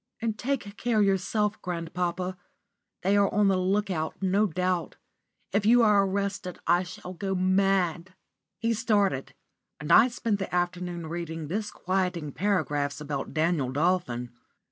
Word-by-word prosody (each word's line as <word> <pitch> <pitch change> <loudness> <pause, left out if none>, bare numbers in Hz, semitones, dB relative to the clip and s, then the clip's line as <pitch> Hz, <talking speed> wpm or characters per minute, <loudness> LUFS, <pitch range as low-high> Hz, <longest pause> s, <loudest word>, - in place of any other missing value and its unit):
"And 225 -2 -1
take 235 -4 -3
care 225 -3 +2
yourself, 205 +2 0
grandpapa. 180 +1 -3 0.7
They 195 +2 +3
are 200 -1 +3
on 205 -1 +3
the 190 - +3
look 195 +2 +1
out, 160 -3 -2
no 195 +3 +2
doubt. 180 0 -1 0.6
If 205 +1 +1
you 240 +1 +6
are 210 -2 +5
arrested, 195 -2 -3
I 175 +2 +4
shall 180 0 -8
go 190 +1 -3
mad." 185 -1 +1 0.4
He 230 0 0
started, 205 - 0 0.4
and 150 - -3
I 240 - +8
spent 230 -4 -2
the 190 - -4
afternoon 175 -1 -2
reading 165 -2 -5
disquieting 185 -5 -2
paragraphs 150 -7 0
about 145 -1 -5
Daniel 155 -5 +1
Dolphin. 140 -6 0
185 Hz, 140 wpm, -27 LUFS, 170-205 Hz, 0.7 s, I